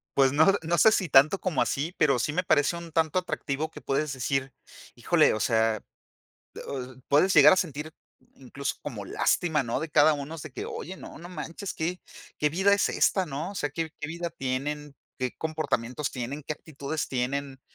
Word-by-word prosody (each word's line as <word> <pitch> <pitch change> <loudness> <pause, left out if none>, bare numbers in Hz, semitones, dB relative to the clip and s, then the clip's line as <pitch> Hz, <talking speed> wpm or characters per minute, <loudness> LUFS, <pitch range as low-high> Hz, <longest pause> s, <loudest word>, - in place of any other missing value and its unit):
Pues 135 -1 +5
no, 155 +2 +5 0.2
no 170 +1 0
sé 220 - +7
si 185 -7 +1
tanto 145 +9 +6
como 175 -8 0
así, 155 +6 -1
pero 140 -4 +3
sí 150 +5 -1
me 180 +3 0
parece 145 +1 +2
un 170 -1 -9
tanto 160 +2 +2
atractivo 155 -3 -3
que - - -11
puedes 140 +1 -1
decir, 135 +1 -2 0.4
¡híjole! - - +3
O 110 - -2
sea, 110 -1 +2 1.3
puedes 155 +7 +4
llegar - - +9
a - - +4
sentir 155 -3 -3 0.4
incluso 135 +1 -4
como 115 -9 -6
lástima, 155 - +1
¿no? 120 +1 -2
De 160 - -4
cada 155 +2 +6
unos 145 +2 -5
de 155 - -8
que, - - -5
oye, 190 +3 -6
no, - - -11
no 175 - -10
manches, 180 +1 -6
qué 175 +3 -3 0.4
qué 150 - +2
vida 190 +5 +4
es 200 - +2
esta, 190 -3 +2
¿no? 155 +6 -4
O - - -13
sea, 145 -6 -2
¿qué 160 +2 -3
qué 150 - -4
vida 170 +1 -4
tienen?, 145 0 -4 0.2
¿qué 130 -1 -2
comportamientos 150 -4 -2
tienen?, 130 +4 -5
¿qué - - -1
actitudes 150 0 -5
tienen?, 135 +1 -2
150 Hz, 190 wpm, -27 LUFS, 135-165 Hz, 1.3 s, llegar